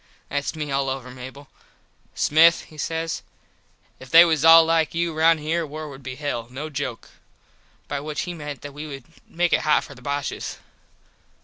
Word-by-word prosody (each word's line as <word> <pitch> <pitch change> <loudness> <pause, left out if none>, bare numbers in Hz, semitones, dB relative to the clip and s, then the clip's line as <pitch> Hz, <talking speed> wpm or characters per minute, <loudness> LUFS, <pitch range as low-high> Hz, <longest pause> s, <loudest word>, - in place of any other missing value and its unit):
Thats 145 +2 -2
me 150 -2 -4
all 135 0 0
over, 130 -1 -5
Mable. 130 +3 -10 0.7
"Smith" 165 +2 +4
he 155 - -16
says 165 +2 -3 0.8
"If 130 - -12
they 165 +5 +9
was 160 -3 +1
all 165 0 +9
like 165 -1 +1
you 170 0 0
round 160 +1 +4
here 165 +3 -1
war 155 0 -7
would 135 -1 -11
be 130 -1 -7
hell, 135 -5 -4
no 145 +5 -6
joke." 135 -5 -5 0.8
By 145 - -3
which 150 +1 -4
he 175 - -4
meant 150 -4 -7
that 145 -1 -8
we 150 +2 -7
would 135 -3 -8 0.2
make 175 +1 0
it - - +3
hot 155 - +3
for - - -11
the 130 - -16
Boshes. 140 +1 -4
150 Hz, 185 wpm, -23 LUFS, 140-160 Hz, 0.8 s, they